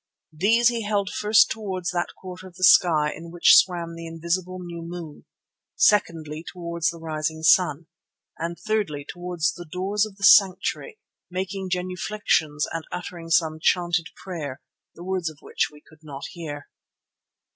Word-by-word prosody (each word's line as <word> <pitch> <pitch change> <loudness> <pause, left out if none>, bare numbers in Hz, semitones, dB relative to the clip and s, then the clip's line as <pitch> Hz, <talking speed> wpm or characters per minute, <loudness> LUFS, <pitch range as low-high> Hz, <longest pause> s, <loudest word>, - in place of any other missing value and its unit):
These 225 +9 +4
he 235 -1 -2
held 205 -2 -1
first 210 +1 +4
towards 190 -5 -3
that 175 -1 -2
quarter 185 0 -9
of 180 - -16
the 185 - -7
sky 155 -4 +5
in 170 +1 -10
which 175 0 +6
swam 170 -2 +3
the 165 0 -8
invisible 170 +3 -3
new 170 -2 -7
moon, 165 -3 -8 0.5
secondly 165 -6 +2
towards 170 -2 -2
the 170 - -7
rising 160 -1 -3
sun, 160 -1 +4 0.5
and 170 +1 -3
thirdly 205 -10 -2
towards 175 -3 -2
the 175 -3 -11
doors 200 +4 0
of 205 - -14
the 200 - -11
sanctuary, 200 - +4 0.3
making 185 +1 -4
genuflexions 180 -4 0
and 165 -1 -5
uttering 175 -1 -7
some 160 -1 +2
chanted 175 -1 +1
prayer, 150 -8 -6 0.4
the 170 - -10
words 185 -2 -2
of 155 - -13
which - - -1
we 150 0 -17
could 155 - -19
not 145 -3 -9
hear. 150 -4 -7
175 Hz, 155 wpm, -24 LUFS, 160-185 Hz, 0.5 s, which